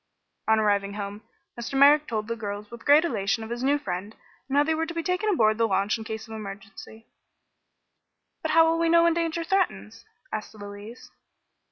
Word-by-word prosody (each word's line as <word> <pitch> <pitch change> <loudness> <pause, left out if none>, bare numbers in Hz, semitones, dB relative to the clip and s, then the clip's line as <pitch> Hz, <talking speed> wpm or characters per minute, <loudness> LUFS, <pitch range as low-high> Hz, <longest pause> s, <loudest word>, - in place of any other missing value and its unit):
On 220 0 +4
arriving 200 -2 +1
home 205 0 -6 0.3
Mr. 240 +3 -4
Merrick 290 +2 +6
told 215 -2 -3
the 230 - -2
girls 205 -1 -6
with 235 -1 -11
great 295 +3 +6
elation 220 -5 -1
of 220 - -8
his 240 +1 -4
new 280 +3 +2
friend, 200 -4 -5 0.3
and 275 - 0
how 290 - +6
they 320 +2 0
were 320 +1 -1
to 340 - -7
be 335 - -2
taken 365 +5 0
aboard 220 - +2
the 230 - +3
launch 200 0 +1
in 225 - -6
case 220 0 -6
of 225 - -9
emergency. 200 +1 -9 1.4
"But - - -3
how 325 +1 +5
will 330 0 +1
we 335 0 +2
know 335 0 +5
when 335 0 +4
danger 335 0 -1
threatens?" 235 - -1 0.3
asked 215 0 -5
Louise. 205 +3 -10
225 Hz, 200 wpm, -26 LUFS, 210-315 Hz, 1.4 s, Merrick